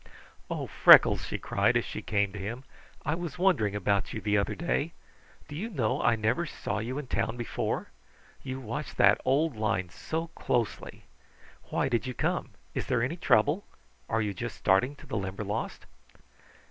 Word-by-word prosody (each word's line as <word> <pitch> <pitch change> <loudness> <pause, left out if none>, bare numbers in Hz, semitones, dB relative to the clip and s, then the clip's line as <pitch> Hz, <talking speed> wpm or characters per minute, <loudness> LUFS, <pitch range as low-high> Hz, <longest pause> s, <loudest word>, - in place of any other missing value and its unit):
"Oh - - -2
Freckles," - - +7
she - - -3
cried - - +2
as - - -1
she - - -5
came 100 -2 0
to 105 - -6
him. 115 +7 -5 0.4
"I 150 - +1
was 170 -1 -4
wondering 175 - +2
about 100 -1 0
you - - -3
the 105 -1 0
other 100 -1 +1
day. 170 -1 -1 0.5
Do 145 - -8
you 205 +9 -3
know 130 - 0
I 120 - +4
never 115 +10 0
saw 110 - -3
you 120 +5 -3
in 145 - -4
town 120 -1 -1
before. 120 -3 -3 0.5
You 130 -1 -5
watch 135 +5 -5
that 100 0 +5
old 140 +2 +2
line 110 -4 -1
so 165 - -4
closely! 120 -7 -2 0.6
Why - - 0
did 120 -1 0
you 125 - -4
come? - - -1 0.2
Is - - -3
there 125 -2 +1
any 135 +7 -1
trouble? 145 - +3 0.5
Are 115 0 +1
you 105 -1 -2
just 90 - -5
starting 100 +9 +2
to - - -15
the 110 - -3
Limberlost?" 100 +3 -4
120 Hz, 175 wpm, -29 LUFS, 105-145 Hz, 0.6 s, Freckles